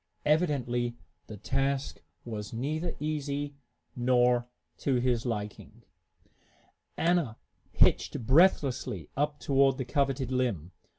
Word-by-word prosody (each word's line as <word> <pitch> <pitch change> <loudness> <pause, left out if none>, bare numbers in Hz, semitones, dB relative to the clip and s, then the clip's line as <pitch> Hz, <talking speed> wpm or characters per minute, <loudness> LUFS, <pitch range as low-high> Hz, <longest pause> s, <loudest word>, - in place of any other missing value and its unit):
Evidently 125 -7 +1 0.3
the 110 - -8
task 135 +5 -1 0.2
was 105 -3 -6
neither 155 +8 -2
easy 145 -1 -2 0.4
nor 125 0 +3 0.3
to 135 - +1
his 125 -1 +1
liking. 105 -3 -5 1.1
Anna 165 -9 +1 0.3
hitched 115 - +2
breathlessly 130 - +3
up 145 +1 -1
toward 135 -1 +3
the 130 - -3
coveted 135 -1 0
limb. 115 - -1
130 Hz, 100 wpm, -29 LUFS, 120-145 Hz, 1.1 s, nor